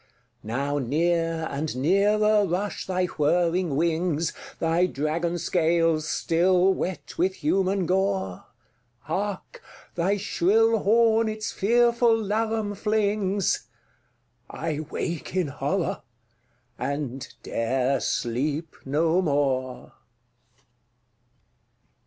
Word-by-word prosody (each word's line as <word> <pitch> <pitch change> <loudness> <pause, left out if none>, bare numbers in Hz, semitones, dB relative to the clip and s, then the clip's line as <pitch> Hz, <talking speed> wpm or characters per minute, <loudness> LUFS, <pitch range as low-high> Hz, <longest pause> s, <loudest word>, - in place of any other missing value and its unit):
Now 140 +6 -2
near 165 +4 0
and 145 0 -3
nearer 205 +7 +3
rush 185 +4 -3
thy 185 -1 0
whirring 170 0 +1
wings, 165 0 0 0.2
Thy 165 +2 +2
dragon 165 +3 -2
scales 165 -2 +1
still 180 +3 +3
wet 185 -1 -5
with 185 +2 +1
human 190 +4 +1
gore. 190 - -1 0.6
Hark, 200 0 -4 0.3
thy 185 +4 +1
shrill 220 +4 +2
horn 225 +1 +3
its 215 0 -4
fearful 235 +2 +3
laram 220 0 -1
flings! 205 -2 0 0.8
—I 155 -2 -3
wake 170 +1 -4
in 180 -6 +1
horror, 160 +7 -2 0.8
and 135 -3 -4
'dare 130 +3 0
sleep 140 +7 -2
no 160 +6 +2
more! 135 -5 -1
175 Hz, 90 wpm, -25 LUFS, 150-200 Hz, 0.8 s, nearer